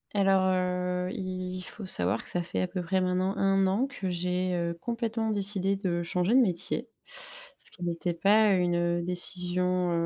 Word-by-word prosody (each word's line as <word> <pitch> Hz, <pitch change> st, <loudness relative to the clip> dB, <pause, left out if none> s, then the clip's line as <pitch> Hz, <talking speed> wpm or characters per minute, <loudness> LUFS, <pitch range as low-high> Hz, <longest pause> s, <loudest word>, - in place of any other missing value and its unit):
Alors, 195 Hz, -1 st, +4 dB
heu, 180 Hz, 0 st, 0 dB
il 185 Hz, -1 st, -4 dB
faut 185 Hz, +5 st, -7 dB
savoir 90 Hz, -, -1 dB
que -, -, -2 dB
ça 175 Hz, -, 0 dB
fait 170 Hz, -, -3 dB
à 185 Hz, -, 0 dB
peu 180 Hz, 0 st, -4 dB
près 185 Hz, +2 st, 0 dB
maintenant 185 Hz, +1 st, 0 dB
1 195 Hz, 0 st, +3 dB
an 200 Hz, +7 st, +2 dB
que 255 Hz, -9 st, -4 dB
j'ai, 180 Hz, +1 st, -1 dB
heu, 170 Hz, -1 st, -1 dB
complètement 230 Hz, -1 st, -2 dB
décidé 200 Hz, -2 st, +1 dB
de 180 Hz, -3 st, -1 dB
changer 180 Hz, +4 st, +1 dB
de 260 Hz, -, +7 dB
métier. 215 Hz, +2 st, +1 dB, 0.2 s
Ce -, -, -3 dB
qui 180 Hz, -, -8 dB
n'était 170 Hz, 0 st, -2 dB
pas 205 Hz, +4 st, +4 dB
une, 180 Hz, -1 st, +1 dB
heu, 175 Hz, 0 st, +1 dB
décision, 180 Hz, 0 st, 0 dB
185 Hz, 180 wpm, -28 LUFS, 180-195 Hz, 0.2 s, de